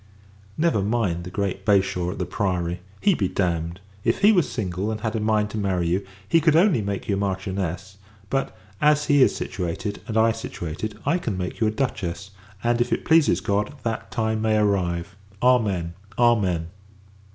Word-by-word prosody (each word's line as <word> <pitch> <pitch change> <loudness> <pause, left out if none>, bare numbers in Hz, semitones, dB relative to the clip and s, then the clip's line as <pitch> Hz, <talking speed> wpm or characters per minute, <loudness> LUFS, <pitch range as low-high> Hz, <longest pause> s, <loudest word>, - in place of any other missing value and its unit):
Never 160 -10 +2
mind 100 -5 0
the - - -6
great 95 0 -2
Bashaw 95 -3 +2
at 90 - -5
the - - -2
Priory. 90 -4 -1 0.2
He 205 - +4
be 100 - 0
damned! 85 -1 -1 0.2
If 115 +8 +1
he 210 +1 +7
was 180 -7 +3
single, 95 -2 -2
and 110 -1 -3
had 110 -1 -2
a - - 0
mind 105 -1 +1
to 110 - -3
marry 95 -4 0
you, 95 +3 0 0.2
he 165 - +4
could 160 -1 +4
only 170 - +4
make 100 -1 -4
you 100 - +1
a - - -2
Marchioness: 95 -1 -3 0.3
but, 135 +5 -2 0.2
as 150 0 +4
he 145 -1 +4
is - - +5
situated, 95 +3 -4
and 110 - -2
I 115 +1 +5
situated, 105 -1 -5
I 165 +6 +2
can 110 - -3
make 90 +4 -4
you 110 - +4
a - - +3
Duchess; 100 -5 -3 0.3
and, 120 0 +2
if 120 - 0
it - - -1
pleases 160 - +4
God, 105 +7 -1
that 115 0 -3
time 110 -2 -1
may 110 -1 +2
arrive! 90 -4 0 0.3
Amen. 100 -9 +2 0.2
Amen. 95 -9 +2
100 Hz, 185 wpm, -24 LUFS, 90-115 Hz, 0.3 s, he